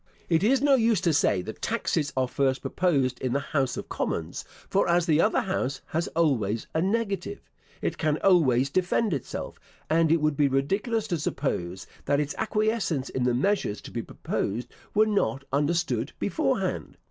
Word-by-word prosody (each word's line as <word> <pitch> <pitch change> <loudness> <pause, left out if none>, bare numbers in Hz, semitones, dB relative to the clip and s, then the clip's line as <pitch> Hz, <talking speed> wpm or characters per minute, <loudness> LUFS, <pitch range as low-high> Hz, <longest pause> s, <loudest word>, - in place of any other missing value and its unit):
It 165 +1 +3
is 260 +5 +3
no 285 -1 +5
use 230 -5 +3
to 170 - +2
say 95 -9 +2
that 110 - -8
taxes 165 -9 -1
are 130 -1 +2
first 135 0 0
proposed 135 -9 0
in 130 -2 -1
the 140 - +2
House 140 -2 -1
of - - -5
Commons; 80 +1 -3 0.2
for - - +1
as 170 0 +3
the 160 -2 +3
other 215 - +3
house 140 -8 -2
has 165 +2 -1
always 115 -10 +1
a 160 - +1
negative, 210 - -2 0.4
it - - -2
can 155 -1 +1
always 140 -8 +4
defend 185 +4 +1
itself; 135 - -5 0.3
and 160 0 +4
it 165 - +4
would 155 -1 +1
be 145 0 +3
ridiculous 195 - 0
to 170 -4 0
suppose 95 -12 -2 0.2
that 140 - +2
its 145 0 -1
acquiescence 215 - 0
in 130 -1 -1
the 125 -1 +2
measures 135 - 0
to - - -10
be - - -3
proposed 120 +4 -3 0.3
were 215 +1 +5
not 200 -10 0
understood 145 -4 0
before - - 0
hand. - - -3
155 Hz, 180 wpm, -27 LUFS, 130-195 Hz, 0.4 s, no